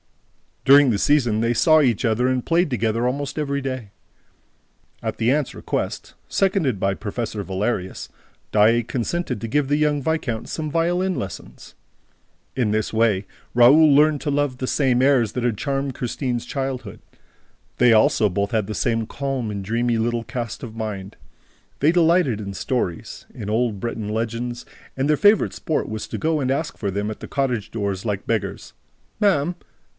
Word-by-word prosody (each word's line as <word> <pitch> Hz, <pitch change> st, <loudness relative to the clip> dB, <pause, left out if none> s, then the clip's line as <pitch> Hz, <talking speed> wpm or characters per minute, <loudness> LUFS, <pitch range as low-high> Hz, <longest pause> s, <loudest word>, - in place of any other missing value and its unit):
During 140 Hz, 0 st, +7 dB
the 110 Hz, -, +1 dB
season, 120 Hz, -7 st, +2 dB
they 115 Hz, +1 st, +1 dB
saw 155 Hz, +6 st, +5 dB
each 125 Hz, -3 st, +1 dB
other 115 Hz, +2 st, +2 dB
and 130 Hz, -1 st, 0 dB
played 170 Hz, 0 st, +2 dB
together 115 Hz, -2 st, 0 dB
almost 140 Hz, +3 st, -3 dB
every 140 Hz, -2 st, -1 dB
day. 130 Hz, -6 st, -5 dB, 1.1 s
At -, -, -3 dB
the 115 Hz, +2 st, +2 dB
aunt's 145 Hz, -1 st, 0 dB
request, -, -, -4 dB
seconded 185 Hz, -, +1 dB
by 95 Hz, 0 st, +1 dB
Professor 105 Hz, 0 st, -4 dB
Valerius, 95 Hz, 0 st, -3 dB, 0.4 s
Daae 110 Hz, +3 st, +4 dB
consented 125 Hz, +1 st, -3 dB
to 115 Hz, -, -3 dB
give 145 Hz, +4 st, +1 dB
the 145 Hz, +1 st, +2 dB
young 150 Hz, -1 st, +1 dB
viscount 135 Hz, -7 st, -2 dB
some 155 Hz, -2 st, -4 dB
violin 175 Hz, +3 st, +1 dB
lessons. 95 Hz, -, -8 dB, 0.8 s
In 120 Hz, -5 st, +1 dB
this 110 Hz, +1 st, -1 dB
way, 110 Hz, -3 st, +2 dB, 0.3 s
Raoul 140 Hz, +5 st, +6 dB
learned 150 Hz, 0 st, +4 dB
to 150 Hz, -, -1 dB
love 140 Hz, -3 st, 0 dB
the 130 Hz, -, -3 dB
same 130 Hz, -3 st, +2 dB
airs 130 Hz, -5 st, +3 dB
that 125 Hz, -, -3 dB
had 120 Hz, -4 st, 0 dB
charmed 135 Hz, 0 st, -2 dB
Christine's 125 Hz, -1 st, -3 dB
childhood. 135 Hz, -2 st, -4 dB, 0.8 s
They 120 Hz, -1 st, +5 dB
also 110 Hz, -1 st, +4 dB
both 100 Hz, +3 st, -1 dB
had 110 Hz, -4 st, 0 dB
the 110 Hz, -, -4 dB
same 115 Hz, -2 st, 0 dB
calm 135 Hz, -5 st, -3 dB
and 100 Hz, -1 st, -4 dB
dreamy 115 Hz, +2 st, 0 dB
little 115 Hz, +1 st, -1 dB
cast 115 Hz, -1 st, -5 dB
of 115 Hz, -3 st, -7 dB
mind. 105 Hz, -3 st, -5 dB, 0.6 s
They 150 Hz, +3 st, +4 dB
delighted 170 Hz, -, +3 dB
in 100 Hz, -1 st, -6 dB
stories, 95 Hz, -5 st, -3 dB
in 105 Hz, -, -6 dB
old 110 Hz, -2 st, 0 dB
Breton 110 Hz, -1 st, -4 dB
legends; 115 Hz, +2 st, -3 dB, 0.3 s
and 135 Hz, +2 st, 0 dB
their 150 Hz, -, +3 dB
favorite 205 Hz, +4 st, +4 dB
sport 155 Hz, -, -2 dB
was 110 Hz, 0 st, -5 dB
to -, -, -5 dB
go 160 Hz, -1 st, +1 dB
and 130 Hz, -2 st, -1 dB
ask 150 Hz, +3 st, -2 dB
for 100 Hz, -3 st, -2 dB
them 100 Hz, +2 st, -2 dB
at 110 Hz, -, -6 dB
the -, -, -8 dB
cottage 125 Hz, -7 st, -2 dB
doors, 100 Hz, -3 st, -3 dB
like 105 Hz, -3 st, -3 dB
beggars: 105 Hz, -4 st, -3 dB, 0.5 s
"Ma'am 180 Hz, -5 st, +2 dB
120 Hz, 170 wpm, -22 LUFS, 110-145 Hz, 1.1 s, During